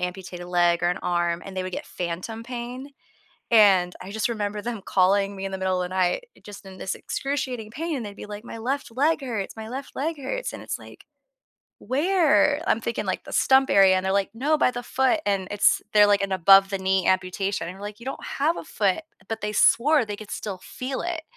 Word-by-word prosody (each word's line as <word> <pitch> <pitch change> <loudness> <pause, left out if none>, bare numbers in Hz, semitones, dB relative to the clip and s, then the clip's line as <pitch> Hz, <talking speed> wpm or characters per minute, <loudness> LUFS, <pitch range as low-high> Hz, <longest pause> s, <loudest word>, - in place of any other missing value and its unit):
amputated 180 -1 -5
leg 175 -1 +2
or 175 - +3
an 180 - -2
arm, 175 -1 0
and 195 -1 -9
they 185 - -1
would 185 0 -6
get - - -5
phantom 180 +6 -5
pain, 245 +2 -6 0.6
and 195 -5 +5
I 190 - -8
just 220 +2 -1
remember 210 -2 -3
them 230 -2 -4
calling 195 +1 +2
me 195 0 -5
in 195 - -4
the - - -2
middle 190 -1 0
of - - -1
the 185 - -6
night, 185 - +1
eh, - - -22
just 205 -1 -11
in 190 -1 -11
this 190 - -3
excruciating 260 -6 -3
pain, 305 0 -3
they'd 205 -1 -8
be - - -8
like, 210 +1 -8
"My 235 - -8
left 260 +3 -3
leg 300 +4 +2
hurts, 225 -7 -4
my 220 0 -8
left 265 +3 -7
leg 315 +4 -2
hurts," - - -4
and - - -7
it's - - -4
like, - - -14 0.8
"Where?" 295 - +2
I'm 220 - +2
thinking, 235 -3 -3
like, 185 - -2
the - - -10
stump 265 0 +4
area, 195 -1 +6
and 185 - -1
they're 190 - +1
like, 200 0 +1
"No, 295 +6 +1
by 255 - +4
the 245 -1 -5
foot." 265 +5 +1
And 195 -2 0
it's 205 -1 +3
they're 210 -1 +7
like 205 -1 +3
an 200 - -2
above-the-knee 190 0 +4
amputation 185 -1 0
and 180 - -8
we're - - -12
like, 205 0 -7
"You - - -11
don't 270 - -5
have 310 +5 0
a - - -7
foot," 205 -4 0 0.3
but 225 0 -4
they 210 +1 -3
swore 285 +6 +4
they 210 -1 -5
could 210 0 -11
still 195 -4 -5
feel 260 +1 -5
it. 345 -2 -3
205 Hz, 225 wpm, -25 LUFS, 190-255 Hz, 0.8 s, they're